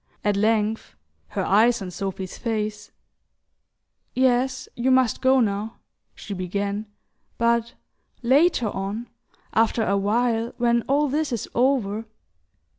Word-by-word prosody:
At 205 0 +2
length, 215 - 0 0.3
her 195 - -3
eyes 230 +4 +4
on 190 -3 -6
Sophy's 190 0 -5
face: 215 -3 -3 1.3
"Yes, 260 0 +1
you 245 +2 0
must 255 -3 +3
go 260 0 +4
now," 215 -1 -1 0.4
she 205 - -7
began; 200 +3 -3 0.5
"but 235 0 +1 0.5
later 265 -2 +3
on... 200 +5 -4 0.4
after 225 0 +2
a 200 - +1
while, 230 +3 0
when 235 -1 +2
all 290 +2 +2
this 295 +1 -1
is 235 -4 -3
over 230 -4 +1
225 Hz, 115 wpm, -24 LUFS, 205-245 Hz, 1.3 s, eyes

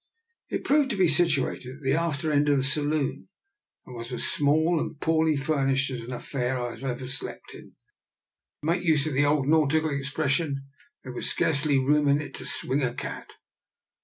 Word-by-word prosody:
It - - -3
proved 290 -1 +3
to 215 - -1
be 185 -2 +4
situated 145 -5 +1
at 145 - -16
the 135 0 +1
after 160 -1 -1
end 145 0 +2
of 145 - +4
the 135 - +1
saloon, 145 +3 -1 0.6
and 125 - -11
was 115 +1 -7
as 125 - -2
small 160 +3 +2
and 155 - -5
poor 160 0 +2
ly 155 - +2
furnished 135 -1 0
an 120 -1 -6
affair 125 0 -3 0.2
as - - -9
I - - -3
have 125 -2 -2
ever 130 -1 -7
slept 130 - -3
in. - - -14 0.9
To - - -6
make 175 +3 +1
use 155 -5 +3
of 155 - -2
the 145 +2 +3
old 145 -1 +2
nautical 155 0 +2
expression, 140 0 -1 0.4
there 130 - -8
was - - -3
scarcely 150 -3 +2
room 145 +2 +2
in 140 +1 +4
it 150 - -7
to - - -6
swing 135 +3 0
a 125 -2 -1
cat. - - -7
145 Hz, 195 wpm, -26 LUFS, 135-155 Hz, 0.9 s, be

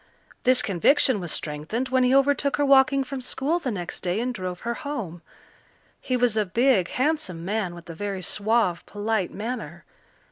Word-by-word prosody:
This 255 0 +5
conviction 225 - +3
was 175 -4 -4
strengthened 155 - -3
when 260 0 +3
he 250 +1 +3
overtook 280 +1 +2
her 290 - +2
walking 275 0 +5
from 275 -1 -6
school 280 +6 -1
the 280 - -3
next 180 -6 -5
day 180 +3 -1
and 250 +2 -1
drove 185 -4 -5
her 235 - -2
home. 235 - -5 0.8
He 255 - -1
was 245 -3 +2
a 215 - +2
big, 220 -1 +2
handsome 255 - -1
man 200 -3 -2
with 170 0 -12
a 165 - -7
very 195 +1 -4
suave, 210 -4 +1
polite 205 -2 -1
manner. 235 +5 -6
230 Hz, 175 wpm, -25 LUFS, 185-265 Hz, 0.8 s, This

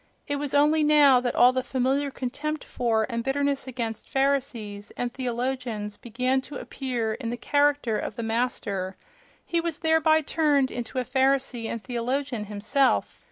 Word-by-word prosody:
It 285 -1 -1
was 285 -1 -3
only 300 +2 +4
now 295 -4 +6
that 245 -1 -2
all 250 +1 +6
the 255 - 0
familiar 265 +2 0
contempt 290 +4 -4
for 225 -3 0
and 235 -2 -3
bitterness 280 +1 0
against 235 -4 -4
Pharisees 245 -7 -1
and 245 -1 -2
theologians 245 -4 -3
began 255 +3 0
to 285 - -9
appear 245 -5 -3
in 230 +1 -5
the 240 - -3
character 285 -5 +1
of - - -5
the 230 - -4
Master—he 225 - -3
was 335 -2 -3
thereby 320 -1 +3
turned 290 -3 +2
into 240 +1 -5
a 255 - 0
Pharisee 265 -2 +1
and 230 -2 -5
theologian 250 -1 -2
himself! 215 +7 +1
255 Hz, 155 wpm, -26 LUFS, 235-285 Hz, -, now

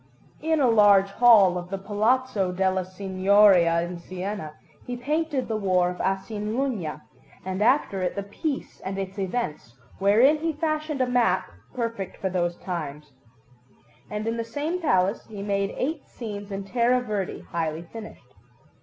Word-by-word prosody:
In 320 0 +1
a 270 - +4
large 205 -3 +5
hall 200 -5 +6
of 175 0 -9
the 195 - -3
Palazzo 215 0 +1
della 190 0 +1
Signoria 185 -2 +4
in 175 0 -6
Siena 185 -2 -5 0.3
he 245 0 -4
painted 295 +1 -1
the 225 - -2
War 185 -4 +2
of 180 - -6
Asinalunga, 205 - -2 0.4
and 190 +1 -3
after 230 -5 +2
it 180 - -1
the 200 - -3
Peace 270 - -4
and 190 +1 -4
its 195 +1 -5
events, 180 - -3 0.2
wherein 230 +10 +5
he 325 +1 -1
fashioned 310 -2 -2
a 255 - +2
map, 235 - +1 0.2
perfect 230 -6 -3
for 190 - -2
those 175 -1 0
times; 150 -5 -6 1.0
and 210 +1 -4
in 230 +1 -1
the 230 - -1
same 295 +10 -3
palace 190 - +1
he 205 -3 -7
made 200 -1 -1
eight 300 +2 -2
scenes 205 -3 -7
in 195 0 -4
terra 240 +4 +2
verde, 210 -6 -3
highly 165 -1 -2
finished. 215 +5 -11
200 Hz, 155 wpm, -25 LUFS, 185-245 Hz, 1.0 s, hall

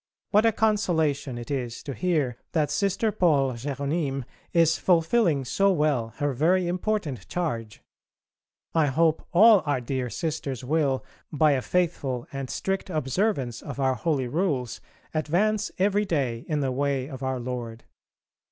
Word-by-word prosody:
What 215 +2 +5
a - - +5
consolation 160 - +1
it 120 +4 -7
is 125 -4 -3
to 140 - -5
hear 150 -7 0 0.2
that 150 -3 +1
Sister 200 +7 +1
Paule 145 -9 +2
Jéronyme 140 +2 -2 0.3
is 165 -1 +3
fulfilling 165 - +2
so 195 +10 +2
well 150 -9 0
her 145 -1 -1
very 175 +8 +2
important 180 - -2
charge. 115 -12 -3 0.9
I 160 -2 +3
hope 160 +3 +1
all 210 +2 +7
our 145 -3 0
dear 125 0 -3
Sisters 145 -4 -3
will 140 -1 0 0.3
by 155 0 +3
a 135 -2 +1
faithful 145 -8 -1
and 135 -2 -4
strict 195 0 -2
observance 140 - -1
of 140 -1 -7
our 130 -1 +2
holy 130 +1 -1
Rules 140 -5 -1 0.3
advance 200 +7 +1
every 205 +2 +2
day 130 - -1
in 150 -2 0
the 135 -2 0
way 135 0 -1
of 135 -3 -8
Our 130 -1 -2
Lord. 120 -2 -5
145 Hz, 145 wpm, -26 LUFS, 130-175 Hz, 0.9 s, all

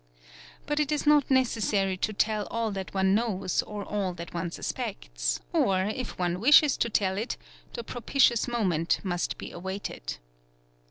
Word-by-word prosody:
But 295 0 -1
it 300 -1 +1
is 300 0 0
not 295 -2 +5
necessary 220 -7 +2
to 200 +4 -1
tell 210 0 0
all 230 -1 -1
that 195 -1 -5
one 190 0 +2
knows 200 -5 +1
or 210 -1 -6
all 195 -4 -2
that 170 0 -8
one 170 0 -2
suspects, - - -3
or, 190 -1 +3
if 255 - -5
one 175 0 -1
wishes 290 +4 +6
to 235 - +1
tell 195 -2 +1
it, 230 - -3 0.4
the 235 - -5
propitious 245 0 +2
moment 185 -9 +1
must 175 -3 -2
be - - -7
awaited. 175 - -5
200 Hz, 160 wpm, -28 LUFS, 185-235 Hz, 0.4 s, wishes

